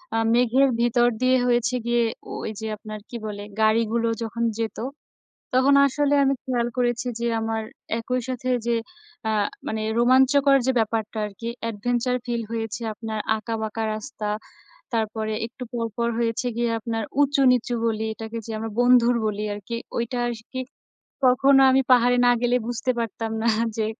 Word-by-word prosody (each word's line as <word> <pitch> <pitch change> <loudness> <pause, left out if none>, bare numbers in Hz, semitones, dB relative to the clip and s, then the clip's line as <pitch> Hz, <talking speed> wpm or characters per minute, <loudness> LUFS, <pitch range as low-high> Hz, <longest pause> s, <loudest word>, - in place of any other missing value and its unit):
আ - - +2 0.2
মেঘের 250 +3 +4
ভিতর 240 0 +3
দিয়ে 255 0 +4
হয়েছে 240 0 +2
গিয়ে 240 0 +2 0.3
ওই - - -4
যে, 220 - -4
আপনার 215 0 -8
কি 240 - -5
বলে? 205 -1 -5 0.2
গাড়িগুলো 225 +1 +2 0.2
যখন 230 +1 -3 0.2
যেত 225 -1 -2 0.8
তখন 265 +2 +5
আসলে 290 +1 +1
আমি 275 0 +3
খেয়াল 240 -2 0
করেছি 240 0 0
যে, 235 - -2
আমার 225 0 -2 0.4
একই 250 +2 -1
সাথে 255 0 -3 0.2
যে, 235 - +2 0.5
অ্যা 220 - 0 0.3
মানে 220 0 -2 0.2
রোমাঞ্চকর 265 +3 +5
যে, 260 - +3
ব্যাপারটা 220 0 -1
আর 210 - -9
কি, 230 - -3 0.2
adventure 245 +3 -1
feel 235 -1 -1
হয়েছে। 225 0 -3
আপনার 220 0 -5 0.2
আঁকা 225 +1 -4
বাঁকা 220 +1 -3
রাস্তা, 215 0 -5 0.7
তারপরে 220 -1 -1
একটু 245 +2 -12
পরপর 230 0 -1
হয়েছে 230 +1 0
গিয়ে 235 -1 +1
আপনার 225 0 -3 0.2
উঁচু 280 -1 +2
নিচু 245 -1 +1
গলি 220 -1 0
এটাকে 225 +1 -6
যে, - - -7
আমরা 225 0 -4
বন্ধুর 245 -1 +5
বলি 210 -1 -2
আর 205 - -7
কি। 235 - -2 0.2
ওইটা 235 +1 -2
আরকি 235 +3 -7 0.7
কখনো 270 +2 +5
আমি 265 +1 +4
পাহাড়ে 245 0 +5
না 245 - +6
গেলে 245 0 +2
বুঝতে 245 +1 -1
পারতাম 225 0 -3
না 230 - +1 0.3
যে, 220 - +1
235 Hz, 165 wpm, -24 LUFS, 225-250 Hz, 0.8 s, না